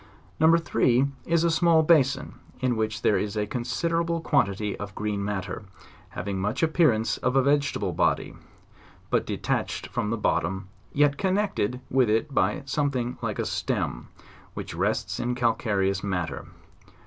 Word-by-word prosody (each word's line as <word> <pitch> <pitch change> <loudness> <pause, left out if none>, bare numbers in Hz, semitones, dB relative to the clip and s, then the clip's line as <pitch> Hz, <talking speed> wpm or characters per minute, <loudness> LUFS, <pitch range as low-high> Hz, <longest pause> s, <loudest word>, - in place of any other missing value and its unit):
No. 160 +1 +6
3 130 -6 +2 0.2
is 170 0 +2
a 170 - +3
small 165 -1 +4
basin, 140 -5 +3 0.3
in 125 -1 +1
which 110 -1 -2
there 105 - +3
is 105 +1 -3
a 105 - +1
consider 165 - -1
able 170 0 -1
quantity 105 -10 +1
of 105 -1 -7
green 105 -1 -2
matter, 100 -2 -3 0.5
having 95 0 -4
much 105 +10 -1
appearance 155 -9 +3
of 125 +1 -1
a 135 - +5
vegetable 140 -8 +1
body, - - +1 0.8
but - - +1
detached - - -2
from 105 - -2
the 115 - -1
bottom, 95 0 -1 0.2
yet 145 0 +2
connected 190 - 0
with 130 -3 +3
it 115 +6 +1
by 150 - +1
something 130 -3 -1
like - - -2
a - - -1
stem, - - -2 0.5
which - - -6
rests - - -1
in 125 +1 -1
calcareous 105 -5 0
matter. 90 -7 -3
125 Hz, 150 wpm, -26 LUFS, 105-150 Hz, 0.8 s, No